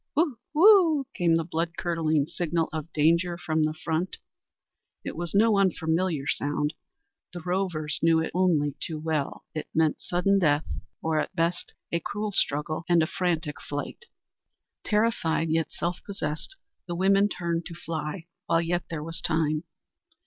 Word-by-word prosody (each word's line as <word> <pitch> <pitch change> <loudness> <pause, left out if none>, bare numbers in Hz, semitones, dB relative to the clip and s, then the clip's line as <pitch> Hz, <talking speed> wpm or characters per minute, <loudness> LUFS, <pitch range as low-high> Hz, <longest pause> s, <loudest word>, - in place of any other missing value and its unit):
"Whoo! 295 -6 +1 0.2
whoo!" 335 -5 +6
came 170 -2 +3
the 165 - +1
blood 165 0 -3
curdling 160 -4 +1
signal 165 0 -1
of 155 +1 -5
danger 170 +3 +2
from 160 -2 0
the 155 0 +1
front. 160 +3 -2 0.9
It - - -4
was 175 +2 -4
no 210 0 +5
unfamiliar 165 -4 +1
sound 145 +1 -1 0.6
the 175 - -6
rovers 175 -4 -1
knew 165 0 +4
it 160 - -2
only 165 -6 +2
too 160 - -3
well. 155 -2 -2
It 155 - -4
meant 160 -1 +2
sudden 195 +3 +2
death 150 -4 +2 0.4
or 160 -1 +1
at 150 - -3
best 170 +1 -1 0.2
a 170 - +1
cruel 210 +5 -3
struggle 155 -2 0
and 165 -2 +4
frantic 165 -6 -1
flight. 145 - -5 0.8
Terrified, 210 -7 +1
yet 165 0 +1
self 175 +1 -3
possessed, 195 - -4 0.3
the 175 - -3
women 195 +3 +4
turned 170 -3 -2
to 170 - -8
fly 165 +1 -4 0.2
while 165 - +3
yet 170 +1 -1
there 160 -2 -4
was 165 +1 -5
time. 155 0 0
165 Hz, 150 wpm, -27 LUFS, 155-180 Hz, 0.9 s, whoo